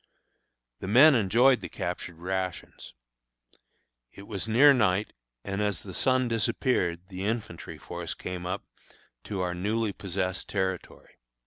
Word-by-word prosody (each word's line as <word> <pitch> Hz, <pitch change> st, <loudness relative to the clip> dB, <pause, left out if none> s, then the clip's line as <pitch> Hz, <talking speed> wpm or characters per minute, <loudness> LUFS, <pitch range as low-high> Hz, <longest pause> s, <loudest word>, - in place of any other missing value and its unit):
The -, -, -6 dB
men 130 Hz, +9 st, +8 dB
enjoyed 120 Hz, +3 st, +4 dB
the -, -, -6 dB
captured 85 Hz, 0 st, -5 dB
rations. 95 Hz, -3 st, -4 dB, 1.2 s
It 100 Hz, -, -12 dB
was 100 Hz, 0 st, -4 dB
near 135 Hz, +6 st, +7 dB
night, 105 Hz, -5 st, +1 dB, 0.3 s
and 100 Hz, +1 st, -3 dB
as 105 Hz, -4 st, -1 dB
the 95 Hz, -, -8 dB
sun 130 Hz, +5 st, +2 dB
disappeared 110 Hz, -6 st, 0 dB
the 95 Hz, 0 st, -6 dB
infantry 110 Hz, -7 st, -4 dB
force -, -, -6 dB
came 90 Hz, -1 st, -5 dB
up 95 Hz, +2 st, -3 dB, 0.6 s
to 100 Hz, -3 st, -3 dB
our 90 Hz, -1 st, -1 dB
newly 105 Hz, +4 st, -1 dB
possessed 95 Hz, -1 st, -3 dB
territory. 95 Hz, -2 st, -4 dB
100 Hz, 130 wpm, -28 LUFS, 90-115 Hz, 1.2 s, men